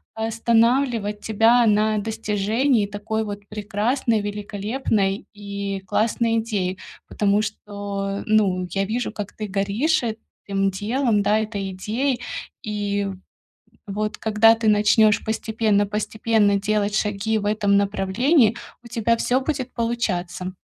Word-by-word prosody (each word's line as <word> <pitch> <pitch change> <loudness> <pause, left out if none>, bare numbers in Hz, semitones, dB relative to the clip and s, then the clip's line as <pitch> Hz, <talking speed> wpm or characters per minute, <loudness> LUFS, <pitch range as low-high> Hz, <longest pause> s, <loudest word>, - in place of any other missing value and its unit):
останавливать 225 -1 +1
тебя 225 +3 +4
на 215 0 +3
достижении 220 +3 0
такой 210 +2 -3
вот 205 -1 -7
прекрасной, 215 +2 0
великолепной 205 0 -2
и 200 -1 -5
классной 230 +2 +1
идеи. 200 -5 -1 0.3
Потому 205 0 +1
что, 200 -1 -4
ну, 195 -4 +2
я 195 +2 -1
вижу, 230 +2 -2
как 210 -2 -6
ты 215 -1 -5
горишь 200 +11 0
этим 200 -3 -3
делом, 215 +2 0
да, 210 +2 +3
этой 205 -3 -3
идеей. 240 +7 -2 0.4
И 205 -1 -2 0.8
вот, 210 +2 -3
когда 220 +1 +5
ты 225 -1 -1
начнёшь 215 +1 +4
постепенно 220 -2 +1
постепенно 210 0 +1
делать 210 0 0
шаги 210 +1 0
в 205 - -4
этом 205 -1 +2
направлении, 215 - +2 0.3
у 235 - -12
тебя 230 0 +1
всё 250 +3 +1
будет 260 -3 -3
получаться. 190 -6 -2
210 Hz, 120 wpm, -22 LUFS, 200-225 Hz, 0.8 s, когда